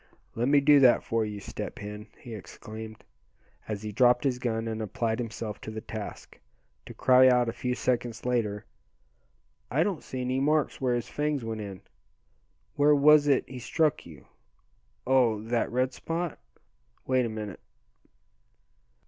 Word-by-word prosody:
"Let 120 +2 -1
me 140 0 +5
do 145 0 +6
that 125 -3 +5
for 115 -1 0
you, 105 -1 -5
Step - - -7
Hen," 105 +1 -8
he 120 - -10
exclaimed, 110 +1 -9 0.6
as 105 -1 -4
he 105 - -4
dropped 125 +3 +4
his 130 -3 0
gun, 115 -2 -2
and 110 0 -3
applied 110 +2 -2
himself 115 -2 -5
to - - -7
the 110 0 -5
task, 110 -1 -8 0.5
to - - -10
cry 130 0 +6
out 125 -1 +4
a 115 - -2
few 125 +1 -2
seconds 120 -3 -2
later, 110 -4 -1 1.0
"I 145 +6 +2
don't 185 -4 -2
see 130 - -6
any 130 +1 -1
marks 150 +1 +1
where 125 -2 +1
his 120 - -3
fangs 145 -4 -2
went 110 -1 -4
in. 100 -3 -7 0.9
Where 145 +1 +4
was 145 +1 +6
it 140 -2 +2
he 130 -1 -8
struck 155 +4 0
you? 75 -6 -14 0.8
Oh! 125 -4 +3
that 115 +1 -1
red 130 +1 0
spot? 165 +2 -4 0.7
Wait 130 -1 +2
a 115 - -2
minute." 105 -4 -6
120 Hz, 160 wpm, -28 LUFS, 110-135 Hz, 1.0 s, do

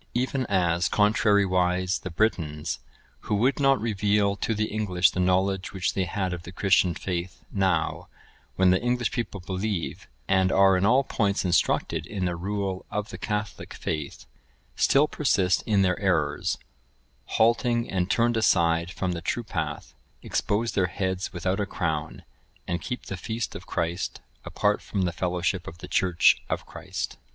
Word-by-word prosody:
Even 130 +1 0
as, 85 -3 +2
contrarywise, 95 -3 +2
the 95 - -6
Britons, 80 -5 -1 0.4
who 105 - -2
would 125 +8 +2
not 135 -1 +4
reveal 105 -2 +1
to 110 +2 -1
the 110 +1 +1
English 95 -5 +2
the - - -4
knowledge 95 +1 +1
which 95 -3 -1
they 95 - 0
had 95 0 -2
of 90 - -5
the 85 - -10
Christian 95 -2 +3
faith, 90 0 -4
now, 95 -5 0 0.5
when 95 -1 +4
the 95 - +2
English 120 -1 0
people 115 -5 -3
believe, 95 0 -3 0.2
and 95 -1 +3
are 95 0 +5
in 95 +2 +2
all 130 +4 +5
points 100 -7 0
instructed 85 -1 +1
in 95 -4 -3
the 90 -1 -1
rule 95 +1 -3
of 105 0 -3
the - - -7
Catholic 105 -1 -4
faith, 75 -3 -4 0.5
still 145 +2 +4
persist 100 -12 +2
in 100 -3 +3
their 90 -1 +1
errors, 80 -7 0 0.8
halting 115 +1 +3
and 90 -1 -1
turned 120 +1 +2
aside 85 -5 +3
from 90 0 -2
the 85 -1 -4
true 120 +7 -2
path, 80 -8 -4 0.3
expose 110 +3 0
their 95 -4 +1
heads 95 +1 -2
without 95 +2 -1
a 100 - -1
crown, 80 -5 -3 0.4
and 85 0 -2
keep 125 - -5
the 95 - -5
Feast 110 +4 -4
of - - -9
Christ 85 +2 -2 0.3
apart 105 0 +1
from 100 -3 -2
the 90 - 0
fellowship 90 +1 -1
of 85 - -8
the 90 - -9
Church 90 0 +3
of - - -2
Christ. - - -5
95 Hz, 160 wpm, -26 LUFS, 90-105 Hz, 0.8 s, are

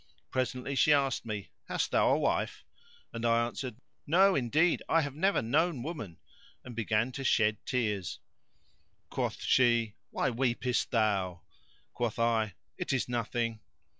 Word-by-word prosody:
Presently 130 +1 -2
she 150 +3 +5
asked 135 -4 +1
me, 105 -3 -5 0.2
"Hast - - -1
thou - - +4
a - - +4
wife?"; - - -1 0.5
and 115 - -5
I 115 0 +3
answered 120 0 -5 0.3
"No, 190 +6 +5
indeed: 150 +6 +2
I 165 - +4
have 145 -3 -3
never 190 - +1
known 145 +3 +1
woman"; 125 - -6 0.5
and 125 -2 -8
began 115 +2 0
to 135 - -5
shed 110 -4 +2
tears. 105 -8 -1 0.9
Quoth - - -2
she 120 -4 +3 0.2
"Why 135 - 0
weepest 125 0 0
thou?" 100 -7 0 0.5
Quoth 120 -3 -2
I 115 -4 +1 0.2
"It - - -2
is 135 -2 0
nothing!" 115 -1 -2
120 Hz, 140 wpm, -30 LUFS, 110-135 Hz, 0.9 s, she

